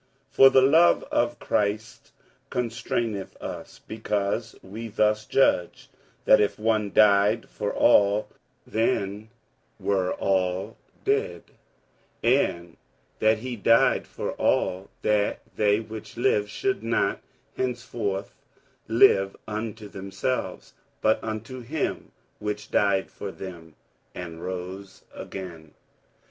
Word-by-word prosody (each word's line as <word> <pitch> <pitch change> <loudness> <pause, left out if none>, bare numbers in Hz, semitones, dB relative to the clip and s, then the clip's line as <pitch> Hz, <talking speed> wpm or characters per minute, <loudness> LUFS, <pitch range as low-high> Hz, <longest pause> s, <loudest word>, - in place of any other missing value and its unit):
47:005:014 - - -31
For 135 - +9
the 135 - +5
love 160 +6 +5
of 120 0 +1
Christ 105 +2 -2 0.4
constraineth 115 -3 -3
us; - - -8
because 110 +1 -2
we 110 +5 -7
thus 105 0 +1
judge, 90 -10 +1 0.3
that 110 - +6
if 105 - 0
one 110 -2 0
died 105 +2 +4
for 105 - -3
all, 105 -2 +4 0.4
then 105 -1 -1 0.5
were 95 -2 0
all 95 +2 0 0.3
dead: 425 +3 0 0.8
47:005:015 130 +4 +4
And 85 -1 -11 0.4
that 110 0 +4
he 125 +2 -5
died 115 +2 +3
for - - -4
all, 95 +2 0
that 105 -1 +1
they 105 -1 +3
which 110 0 -9
live 105 -3 +2
should 395 -1 -1
not - - 0 0.3
henceforth 115 -6 -3 0.5
live 105 -4 +4
unto 110 0 -5
themselves, 100 +6 -4 0.3
but 110 - +2
unto 115 +4 -5
him 140 +6 -3 0.3
which 105 0 -4
died 100 -2 +2
for 100 - -6
them, 85 -5 -10 0.4
and 85 -2 -7
rose 95 +1 -7
again. 85 -5 -9
105 Hz, 110 wpm, -26 LUFS, 95-115 Hz, 0.8 s, For